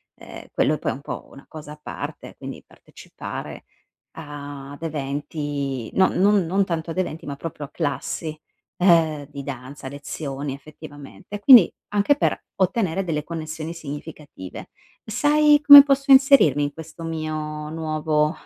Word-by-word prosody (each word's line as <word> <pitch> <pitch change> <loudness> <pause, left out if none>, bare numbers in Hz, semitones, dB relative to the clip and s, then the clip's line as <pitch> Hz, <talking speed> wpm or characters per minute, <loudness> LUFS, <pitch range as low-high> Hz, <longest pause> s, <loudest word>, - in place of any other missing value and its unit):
ehm, - - -12
quello 155 - +2
è - - -8
poi - - -1
è - - -4
un 140 - -11
po' - - -7
una 140 - -14
cosa 150 -2 -9
a 150 - -15
parte, - - -7
quindi - - -9
partecipare - - -10 0.5
ad 145 -2 -9
eventi 140 -3 -4
non 190 - +3
non 200 -1 +3
non 195 +4 +1
tanto 165 -1 -3
ad 180 - -7
eventi, 165 -3 -4
ma 140 - -5
proprio 150 -1 -7
a - - -29
classi, 155 +1 -3 0.4
ehm, 160 -5 +3
di 140 -1 -8
danza, 135 0 -8
lezioni 140 -1 -6
effettivamente. 145 +5 -11
E - - -5
quindi 240 -9 +9 0.2
anche 210 +8 +2
per - - 0
ottenere 190 -1 0
delle 150 -4 -2
connessioni 160 0 -6
significative. 150 - -9 0.4
Sai 295 +6 +3
come 285 -1 +12
posso 275 0 +1
inserirmi 265 - +6
in 145 - -3
questo 160 +1 -10
mio 155 -1 -4
nuovo 155 -1 -1
155 Hz, 150 wpm, -23 LUFS, 145-180 Hz, 0.5 s, come